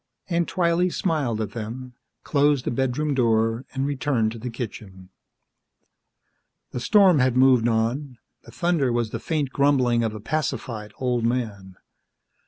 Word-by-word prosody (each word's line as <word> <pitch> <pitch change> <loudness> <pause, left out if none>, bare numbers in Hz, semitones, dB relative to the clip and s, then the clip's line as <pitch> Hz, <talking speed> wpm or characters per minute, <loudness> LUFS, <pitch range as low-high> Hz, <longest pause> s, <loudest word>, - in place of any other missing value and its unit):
Aunt 170 -1 +1
Twylee 175 0 +1
smiled 150 - -1
at 105 -2 -3
them, 120 +3 -7 0.3
closed 145 -2 +2
the - - -1
bedroom 135 +4 -1
door 115 -1 +1
and 135 0 -2
returned 130 -5 0
to 115 - -8
the 125 +3 -5
kitchen. 100 -6 -8 1.6
The - - -4
storm 190 - +5
had 130 -1 +2
moved 130 -3 +5
on; 120 +4 -1 0.2
the - - -17
thunder 170 -7 0
was 120 -2 -1
the - - -4
faint 150 -5 -2
grumbling 130 -5 +2
of 110 -1 -2
a - - -6
pacified 115 -4 -3
old 125 -2 -1
man. 110 -6 -2
125 Hz, 145 wpm, -24 LUFS, 115-145 Hz, 1.6 s, storm